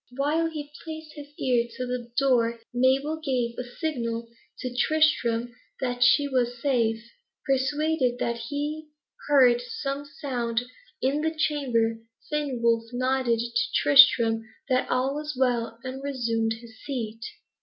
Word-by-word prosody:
While 310 +4 +1
he 295 -2 -7
placed 315 -1 -8
his 290 -1 -9
ear 245 -6 +1
to 255 - -2
the 250 -1 -4
door, 235 -4 +2
Mabel 270 +5 +2
gave 245 -4 0
a - - -2
signal 240 -4 -3 0.3
to 250 -1 -5
Tristram 245 -5 +2 0.3
that 245 -1 -2
she 285 +3 +5
was 245 -3 0
safe. 230 -5 +1 0.4
Persuaded 275 -1 +1
that 235 -1 -1
he 300 +2 -3 0.4
heard 255 -4 +5
some 275 +3 -4
sound 245 -5 -2 0.4
in 275 +3 +1
the 320 +1 -1
chamber, 245 -8 +1 0.3
Fenwolf 235 -6 0
nodded 255 -2 +1
to 235 0 -1
Tristram 235 -5 +6 0.3
that 255 -1 +1
all 255 +2 +1
was 300 -1 -5
right, 240 -3 +1
and 260 +1 -6
resumed 230 -5 -1
his 225 -1 -13
seat. 230 -5 -4
255 Hz, 135 wpm, -26 LUFS, 235-285 Hz, 0.4 s, Tristram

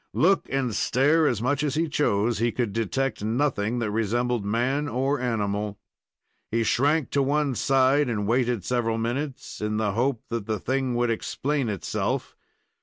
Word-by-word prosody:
Look 190 +5 +3
and 130 -4 -1
stare 150 +9 +3
as 115 -4 0
much 140 +3 +1
as 150 -1 -1
he 165 +2 +1
chose, 115 -7 +1
he 120 +1 +2
could 115 -5 -2
detect 115 +1 -1
nothing 115 -1 0
that 115 -3 -1
resembled 115 +2 0
man 125 +8 0
or 135 +2 0
animal. 105 -4 -2 0.7
He 115 +1 +1
shrank 145 +6 +2
to 140 - +2
one 145 0 +1
side 135 +2 +3
and 105 -3 -1
waited 120 -3 +1
several 115 -2 0
minutes, 130 +4 -4
in 105 0 -1
the 110 -2 +1
hope 120 +3 0
that 115 -3 -3
the 110 -1 0
thing 130 +4 -1
would 120 0 +1
explain 135 +3 -1
itself. 100 -4 -2
120 Hz, 165 wpm, -25 LUFS, 110-135 Hz, 0.7 s, Look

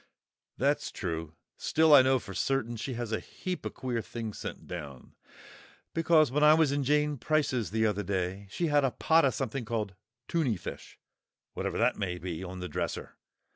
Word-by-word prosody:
"That's 140 +3 +1
true. 80 -4 -4 0.2
Still, 160 -1 +4
I 140 - +10
know 130 +1 +4
for 100 -5 -8
certain 120 0 0
she 120 +3 -4
has 120 -1 -4
a 110 - 0
heap 180 -4 -5
of - - -8
queer 125 -3 -2
things 110 -2 -6
sent - - -6
down, 70 -7 -8 0.8
because 160 -4 +4
when 150 +3 +2
I 150 +1 +8
was 160 -3 +3
in 140 0 0
Jane 150 0 +2
Price's 130 -3 +1
the 110 +2 +1
other 105 -1 +1
day, 95 0 -2
she 170 - -1
had 145 -2 +3
a 135 - +3
pot 160 +5 +3
of 130 - +1
something 135 -1 -2
called 110 -3 -2 0.3
'tunny 140 - +1
fish,' - - -8 0.6
whatever - - -3
that - - +2
may 90 -2 -2
be, 90 0 -5
on 90 0 -7
the 90 - -3
dresser. - - -4
120 Hz, 185 wpm, -30 LUFS, 100-145 Hz, 0.8 s, I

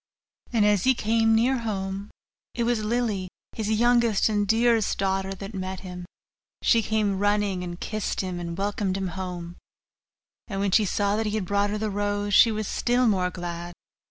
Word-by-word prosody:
And 225 -4 +3
as 205 -3 +3
he 260 0 +5
came 225 0 +2
near 250 +3 +2
home, 195 -3 -4 0.5
it 235 - 0
was 230 -2 0
Lily, 215 -4 -1 0.2
his 215 -2 -3
youngest 235 -1 +3
and 205 -1 0
dearest 225 0 +2
daughter, 195 0 -1
that 195 +3 -8
met 190 -1 -4
him; 180 -2 -8 0.6
she 230 - +4
came 210 -3 0
running, 205 -2 +1
and 175 0 -6
kissed 215 -1 -2
him, 185 -2 -4
and 170 0 -5
welcomed 200 -1 -1
him 190 -1 -2
home; 175 -1 -6 0.9
and 195 -3 -4
when 200 -1 0
she 215 +2 +4
saw 200 +1 0
that 220 0 0
he 210 - -2
had 210 -4 -1
brought 200 +2 +1
her 210 - -2
the 215 0 -2
rose, 205 0 -1
she 230 - +7
was 215 -1 -3
still 245 +1 +1
more 185 -4 +2
glad. 175 -1 -6
205 Hz, 185 wpm, -25 LUFS, 190-220 Hz, 0.9 s, she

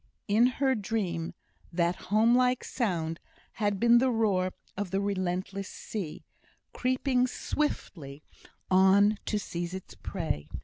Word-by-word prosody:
In 220 +4 +5
her 270 -2 +3
dream 195 -7 -2 0.4
that 170 +1 +1
home 215 +4 +4
like 250 0 +3
sound 170 -9 -2 0.3
had 205 -2 -1
been 235 +1 +6
the 260 +1 +3
roaring 200 -6 +1 0.2
of 200 -1 -3
the 195 - 0
relentless 195 0 -2
sea, 190 -8 -6 0.5
creeping 255 0 +1
swiftly 155 - -3 0.5
on 195 +3 +5
to 210 - +1
seize 175 -2 -4
its 190 - -8
prey. 160 - -4
200 Hz, 125 wpm, -29 LUFS, 180-230 Hz, 0.5 s, been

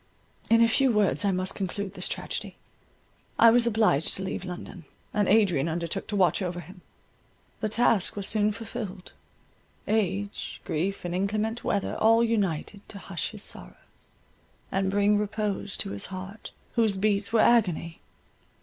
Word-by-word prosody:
In 230 0 +6
a - - +5
few 265 +3 +3
words 210 -2 +2
I 200 - +2
must 185 0 -1
conclude 195 0 -4
this - - +2
tragedy. - - -4 0.8
I 230 - +8
was 235 0 +4
obliged 215 -10 +3
to 190 - -4
leave 190 0 -4
London, 180 -1 -8 0.3
and 205 -2 +1
Adrian 190 -8 +3
undertook 170 +4 -3
to 210 - -3
watch 190 0 +3
over 180 -1 -3
him; 180 +3 -12 0.8
the 215 - -1
task 220 -3 +2
was 200 -1 -3
soon 210 -1 +2
fulfilled; 215 -4 -7 0.7
age, 205 -1 -1
grief, 180 +5 -2
and 175 - -3
inclement 215 +5 -1
weather, 200 - -1
all 225 +1 +5
united 200 -4 -1
to 200 - -8
hush 190 -3 -4
his 210 -1 -7
sorrows, - - -6 1.0
and 195 0 0
bring 205 +1 +3
repose 210 -1 -2
to - - -3
his 100 0 -3
heart, 190 +3 -8 0.2
whose 220 -4 +2
beats 200 +1 +1
were 225 -1 +4
agony. 180 -8 +2
200 Hz, 155 wpm, -27 LUFS, 185-220 Hz, 1.0 s, I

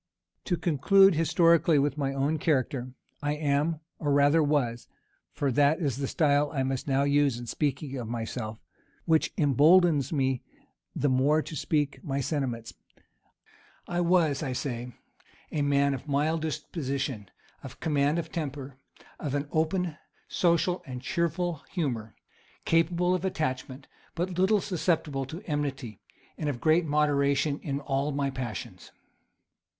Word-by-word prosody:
To 175 - 0
conclude 195 +6 +4
historically 165 0 +4
with 140 0 +1
my 140 -2 -1
own 140 +3 0
character: 130 -4 0 0.3
I 145 0 0
am, 150 +2 0 0.2
or 145 -2 -1
rather 145 +3 +4
was, 140 -6 0 0.4
(for 140 -2 -1
that 145 +4 +3
is 140 -7 -1
the 135 -1 -2
style 145 -1 +2
I 135 -3 -1
must 130 +1 -3
now 135 0 +2
use 140 -3 +2
in 120 - -7
speaking 140 +2 -2
of 115 - -5
myself, 115 -2 -5 0.4
which 160 -2 +2
imboldens 150 0 +4
me 130 -4 0 0.5
the 145 - +1
more 140 +4 +3
to 155 - -8
speak 150 -2 -1
my 140 -5 -2
sentiments;) 125 -6 -3 1.1
I 175 0 -1
was, 170 -5 +2
I 135 -5 -2
say, 125 -2 -4 0.6
a 150 - -1
man 140 0 +2
of 135 +2 -7
mild 150 +3 +1
disposition, 140 - -3 0.3
of - - -10
command 145 0 +1
of 165 -1 -4
temper, 140 -4 -5 0.4
of 145 -2 -3
an 145 0 -2
open, 160 +1 0 0.3
social, 175 +1 +1
and 125 -1 -5
cheerful 170 +1 -1
humor, 120 - -3 0.5
capable 170 +2 +2
of 185 -1 -1
attachment, 135 -6 -3 0.3
but 180 +1 -2
little 200 +2 +3
susceptible 165 -7 -1
of 170 +6 -7
enmity, 140 - -3 0.4
and 150 - -1
of 130 -4 -3
great 160 +4 +3
moderation 145 -1 +1
in 140 -1 -3
all 140 +1 -1
my 140 -1 -1
passions. 125 -5 -6
145 Hz, 140 wpm, -28 LUFS, 135-160 Hz, 1.1 s, conclude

